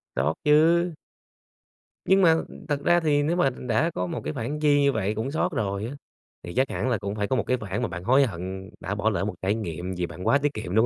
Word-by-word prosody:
Xót 75 +5 0
chứ. 165 +4 +4 1.1
Nhưng 190 +1 +4
mà, 165 -3 +6 0.3
thật 145 -1 -1
ra 175 0 +4
thì 145 -3 +2
nếu 160 +4 +1
mà 175 -6 +3
đã 130 +6 -1
có 90 - -1
một - - -4
cái 75 - -3
khoản 145 +7 -3
chi 145 -1 +4
như 140 0 +4
vậy 110 -4 -1
cũng 115 +6 -3
xót 175 +4 0
rồi 100 -7 -2
á, 130 +5 -6 0.5
thì 85 - -7
chắc 130 0 +2
hẳn 130 - -2
là 120 - +1
cũng 100 +1 -4
phải 105 -1 -1
có 130 - 0
một 115 - +1
cái 130 - 0
khoản 105 -3 -4
mà - - 0
bạn 90 0 -7
hối 130 +7 +5
hận 95 -2 -6
đã 100 +5 -3
bỏ 105 +2 +1
lỡ 100 -2 -1
một 105 -3 -3
trải 100 +3 +1
nghiệm 90 -3 -4
vì 90 - 0
bạn 85 +2 -7
quá 140 - +5
tiết 145 0 -1
kiệm, 105 -5 -5
đúng 110 +2 +5
115 Hz, 260 wpm, -25 LUFS, 95-145 Hz, 1.1 s, mà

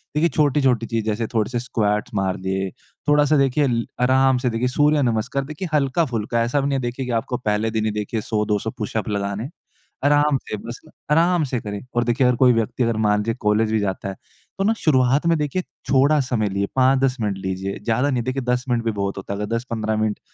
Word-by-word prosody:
देखिए 165 +3 +3
छोटी-छोटी 135 -5 +2
चीज़ 115 -2 -2
जैसे 110 +1 -1
थोड़े-से 115 +2 0
स्क्वेट 105 -3 0
मार 95 -2 0
लिए, 95 0 -2 0.4
थोड़ा-सा 145 0 +4
देखिए 135 +1 +2
ल 115 -2 0 0.2
आराम 130 +1 +4
से 125 - 0
देखिए 115 +2 -1
सूर्य 145 +2 +3
नमस्कार। 125 +4 0
देखिए 155 +5 -5
हल्का-फ़ुल्का, 130 -6 +1
ऐसा 135 +4 0
भी 140 - -1
नहीं 140 -1 0
है - - -2
देखिए 125 +2 -3
कि - - -2
आपको 125 +1 -4
पहले 110 -1 -1
दिन 110 -1 -1
ही 110 - +1
देखिए 105 +1 -3
100-200 105 0 -1
पुश-अप 110 0 -3
लगाने। 100 +4 -2 0.6
आराम 145 -1 +4
से 105 - -3
बस, 120 +4 -8 0.3
आराम 170 +1 +3
से 125 -2 -2
करें 105 -1 -5
और 120 - +3
देखिए 125 +2 +2
अगर 125 - +3
कोई 125 -2 +5
व्यक्ति 115 +2 0
अगर 115 -1 0
मान 105 -1 +2
लीजिए 115 +2 -1
कॉलेज 110 +1 +2
भी 110 - +2
जाता 100 -1 -2
है, 95 - -6 0.4
तो - - +2
ना 225 - +3
शुरुआत 135 0 +2
में 165 -1 +3
देखिए 150 +5 -1 0.2
छोड़ा 140 +3 +4
समय 115 -5 -1
लीजिए, 100 +1 -1
5-10 130 0 +3
मिनट 100 -2 -1
लीजिए 95 +1 -3
ज़्यादा 125 +6 +1
नहीं, 125 -3 0
देखिए 130 +2 -2
10 125 +1 +1
मिनट 120 -1 +1
भी 115 - +1
बहुत 100 -1 -3
होता 95 +1 -5
है। 100 - -5
अगर 110 +3 -2
10-15 110 -2 -2
मिनट 110 -1 -1
120 Hz, 215 wpm, -22 LUFS, 105-135 Hz, 0.6 s, कोई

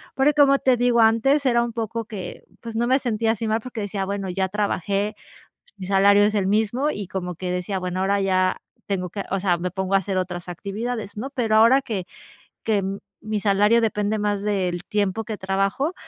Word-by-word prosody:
Porque, 275 +3 +3
como 275 -1 +5
te 260 -1 +3
digo, 245 -1 +2
antes 230 +6 +4
era 235 -2 +3
un 235 - -3
poco 230 0 -3
que, 210 -4 -8 0.2
pues, 230 -1 -8
no 235 +1 +1
me 260 +2 +3
sentía 225 -2 0
así 225 0 -3
mal 220 +1 0
porque 250 -2 -7
decía: 200 -1 -3
"Bueno, 195 0 -3
ya 190 +1 -1
trabajé, 205 0 -1 0.5
pues - - -25
mi 190 - -7
salario 200 +1 +5
es 210 +1 0
el 200 -2 +1
mismo", 225 +8 +1
y 205 -6 -5
como 180 -1 -4
que 180 +2 -4
decía: 180 +2 -2
"Bueno, 185 0 -3
ahora 200 +1 +1
ya 185 -1 +1 0.3
tengo 180 -3 -2
que 200 - -4
o 195 - +1
sea, 180 -2 +1
me 180 +1 -3
pongo 190 0 -1
a 195 - +5
hacer 190 0 -3
otras 180 -1 -3
actividades", 205 +4 -5
¿no? 245 +6 -4
Pero 230 -5 0
ahora 235 +5 +6
que 200 -8 -4 0.6
que 210 -3 +2 0.4
mi 215 -1 -1
salario 210 +3 +4
depende 210 -1 0
más 205 -1 0
del 180 -4 -1
tiempo 205 +1 -1
que 215 -2 -5
trabajo, 195 - -1
205 Hz, 210 wpm, -23 LUFS, 190-230 Hz, 0.6 s, ahora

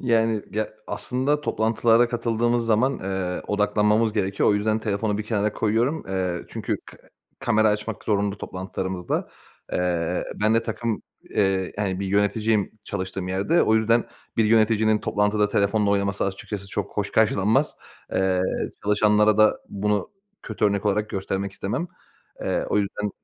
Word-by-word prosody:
Yani, 115 -3 +2
ya 110 0 -1 0.2
aslında 135 +4 -1
toplantılara 115 -2 +2
katıldığımız 120 0 0
zaman, 115 +5 +2
eee, 95 -1 -3
odaklanmamız 105 +1 +2
gerekiyor. 100 -2 +1
O 105 - +4
yüzden 110 +1 +1
telefonu 105 -1 -1
bir 110 - -1
kenara 105 -1 0
koyuyorum. 115 +10 0
Eee, 90 -2 -2
çünkü - - -2
ka - - -13 0.4
kamera 110 -4 +3
açmak 105 +1 -2
zorunlu 100 -1 0
toplantılarımızda. 95 -1 -4 0.4
Eee, 85 -2 0 0.2
ben 110 +1 +4
de 115 - +3
takım 115 -2 -3 0.3
eee, 95 -2 +1
yani, 95 -2 -1
bir 100 - -2
yöneticiyim 105 +2 +1
çalıştığım 95 -1 -4
yerde. 100 - +2
O 110 - +3
yüzden 115 +1 +2 0.3
bir 115 - +4
yöneticinin 110 0 +3
toplantıda 105 0 +1
telefonla 100 +1 +2
oynaması 100 0 +1
açıkçası 100 +1 -5
çok 100 +1 -4
hoş 100 -1 -1
karşılanmaz. 110 +5 +2 0.4
Eee, 95 -1 +2 0.4
çalışanlara 105 +1 +4
da 110 0 +5
bunu 105 - -1 0.3
kötü 110 -1 -3
örnek 100 0 +1
olarak 105 +1 0
göstermek 95 0 -3
istemem. 105 - -3 0.5
Eee, - - 0
o - - +2
yüzden 105 0 -2
105 Hz, 140 wpm, -24 LUFS, 100-110 Hz, 0.5 s, da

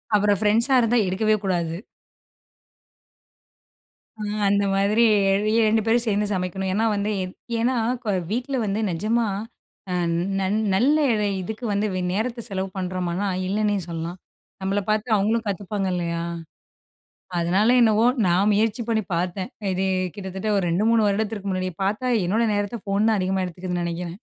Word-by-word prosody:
அப்புறம் 205 -1 +3
பிரெண்ட்ஸ்சா 230 +5 +3
இருந்தா 235 +1 +2
எடுக்கவே 215 +4 +2
கூடாது. 170 -3 -1 2.4
ஆ - - -3 0.2
அந்த 200 0 +2
மாதிரி 200 +4 +2 0.6
இரெண்டு 220 -1 +3
பேரும் 230 +1 +3
சேர்ந்து 210 0 +1
சமைக்கணும். 190 +1 -2
ஏன்னா 220 +3 +1
வந்து 205 +1 -1 0.5
ஏன்னா 250 +3 +2 0.6
வீட்ல 255 +4 -2
வந்து 200 +2 -1
நிஜமா, 220 +7 0 0.7
அ - - -1 0.5
நன் 195 +2 0 0.2
நல்ல 270 +9 +3 0.5
இதுக்கு 220 +6 -6
வந்து 205 +1 +1 0.3
நேரத்த 230 +3 -2
செலவு 190 -1 -3
பண்ணுறோமானா 185 +1 -2 0.2
இல்லன்னே 205 +1 +1
சொல்லலாம். 170 +2 -5 0.4
நம்பள 195 +2 0
பாத்து 215 +2 +1
அவுங்களும் 220 +3 +1
கத்துப்பாங்க 200 0 -2
இல்லையா? 170 -1 -2 1.2
அதனால 180 +6 +2
என்னவோ 220 -1 +4 0.2
நான் 185 +4 +3
முயற்சி 220 +3 +1
பண்ணி 220 -1 +1
பாத்தேன். 180 +2 -2 0.2
இது 185 +1 -1 0.3
கிட்டத்தட்ட 190 0 -5
ஒரு 195 - +1
2,3 220 +6 +3
வருடத்திற்கு 205 0 -1
முன்னாடியே, 185 -1 -2
பாத்தா 215 +6 -1 0.2
என்னோட 215 +6 +1
நேரத்த 205 +3 -2
ஃபோன் 200 +2 +1
தான் 215 - +2
அதிகமா 190 0 0
எடுத்துக்குதுன்னு 180 0 -4
நெனைக்கிறேன். 170 +1 -3
200 Hz, 130 wpm, -23 LUFS, 185-220 Hz, 2.4 s, என்னவோ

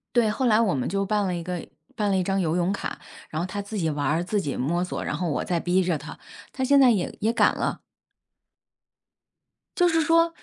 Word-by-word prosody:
对， 235 -2 +4
后 250 +5 0
来 220 -1 +4
我 200 -9 +2
们 130 - -1
就 195 +2 0
办 210 0 +1
了 180 -2 -1
一 170 - -4
个 180 0 -4 0.3
办 210 -4 0
了 195 - +2
一 185 - +2
张 195 +1 0
游 165 -2 0
泳 180 +2 +1
卡， - - -4 0.3
然 155 - -4
后 175 - -1
她 200 +2 -4
自 205 +1 -6
己 165 -4 0
玩 145 -1 -2
儿， 160 +5 +1
自 205 +2 0
己 145 -7 -3
摸 170 +7 0
索， - - -4
然 - - -2
后 175 0 -2
我 130 - -1
再 170 -2 -1
逼 180 +1 +2
着 175 -3 +1
她， - - -9 0.3
她 260 - -2
现 280 +1 +5
在 260 -2 +7
也 200 -6 -1
也 220 +2 +1
敢 235 - +3
了。 - - -2 2.0
就 355 -2 +5
是 325 -1 +2
说， 330 +1 +3
190 Hz, 260 characters per minute, -25 LUFS, 175-220 Hz, 2.0 s, 在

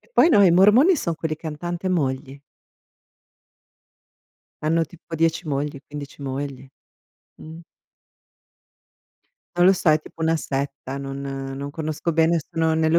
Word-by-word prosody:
E - - -30
poi 345 - +6
no, 205 -11 +6
i 185 - +6
mormoni 210 - +6
son 170 - -2
quelli 160 -1 -3
che 160 - -10
han 155 -1 -4
tante 175 +3 -4
mogli. 140 -5 -2 2.2
Hanno 165 +2 +2
tipo 165 +1 -11
10 165 +1 0
mogli, 145 0 -2
15 145 -1 -9
mogli. 135 0 -5 0.7
Mh. 160 +1 -10 2.0
Non 175 - +4
lo 190 - +7
so, 180 - 0
è 155 0 +5
tipo 155 - -16
una 160 0 +2
setta, 140 -2 -4
non 135 0 -6
non 135 0 -5
conosco 155 +2 -3
bene, 165 +1 +3 0.2
sono 160 -1 +1
nello 160 +1 +3
160 Hz, 145 wpm, -23 LUFS, 140-170 Hz, 2.2 s, lo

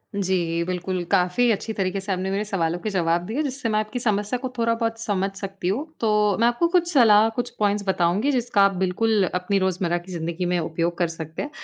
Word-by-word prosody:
जी 175 -4 0
बिल्कुल, 180 +1 -3
काफ़ी 180 +7 +3
अच्छी 220 +1 -2
तरीके 190 0 -1
से 195 +1 -5
आपने 190 0 -1
मेरे 200 +2 0
सवालों 170 -4 0
के 215 - -3
जवाब 170 -3 +1
दिए, 255 +7 -1
जिससे 270 -3 -3
मैं 215 -1 +2
आपकी 215 +3 -3
समस्या 210 0 0
को 260 0 -4
थोड़ा 230 0 +2
बहुत 225 0 -2
समझ 200 -3 -1
सकती 195 -2 -5
हूँ। 200 +7 +1 0.2
तो 225 -2 +1 0.3
मैं 230 - +4
आपको 240 +8 +2
कुछ 345 -1 +2
सलाह, 220 -5 +6
कुछ 245 0 -2
पॉइंट्स 205 -1 +1
बताऊँगी, 190 +8 +1
जिसका 240 -5 +1
आप 195 -1 +1
बिल्कुल 210 +3 +2 0.2
अपनी 195 +2 0
रोज़मर्रा 185 -2 0
की 185 - -10
ज़िंदगी 170 +1 -3
में 180 - +2
उपयोग 170 +1 -2
कर 175 - +1
सकते 160 0 -6
हैं। 290 - -4
195 Hz, 215 wpm, -23 LUFS, 180-225 Hz, 0.3 s, सलाह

